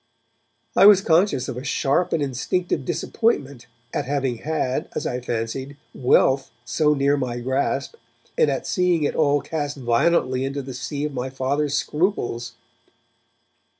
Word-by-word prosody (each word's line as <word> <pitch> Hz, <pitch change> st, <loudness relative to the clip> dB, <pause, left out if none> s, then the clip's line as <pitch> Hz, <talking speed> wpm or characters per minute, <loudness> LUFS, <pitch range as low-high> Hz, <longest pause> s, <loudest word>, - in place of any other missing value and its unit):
I 195 Hz, -, +8 dB
was 205 Hz, -2 st, +8 dB
conscious 165 Hz, -7 st, +2 dB
of 125 Hz, -, -5 dB
a 125 Hz, -, -5 dB
sharp 140 Hz, +5 st, +1 dB
and 155 Hz, -, +1 dB
instinctive 140 Hz, +3 st, -2 dB
disappointment 145 Hz, -, -1 dB, 0.3 s
at -, -, -1 dB
having 135 Hz, -3 st, -1 dB
had, 150 Hz, -4 st, -2 dB
as -, -, -2 dB
I 125 Hz, -, -2 dB
fancied, 125 Hz, +4 st, -4 dB, 0.2 s
wealth 130 Hz, +1 st, +3 dB, 0.2 s
so 150 Hz, +1 st, +2 dB
near 140 Hz, +1 st, +2 dB
my 125 Hz, -3 st, -3 dB
grasp, 130 Hz, -, -1 dB, 0.4 s
and 475 Hz, -2 st, +3 dB
at -, -, -2 dB
seeing 180 Hz, -5 st, +1 dB
it 145 Hz, -, 0 dB
all 145 Hz, -2 st, +2 dB
cast 145 Hz, -3 st, -4 dB
violently 130 Hz, +1 st, +1 dB
into 140 Hz, +1 st, -3 dB
the 130 Hz, 0 st, -7 dB
sea 140 Hz, +3 st, -4 dB
of 150 Hz, -, -4 dB
my 125 Hz, 0 st, -3 dB
Father's 140 Hz, +2 st, -1 dB
scruples. 125 Hz, -, -1 dB
140 Hz, 150 wpm, -23 LUFS, 130-155 Hz, 0.4 s, I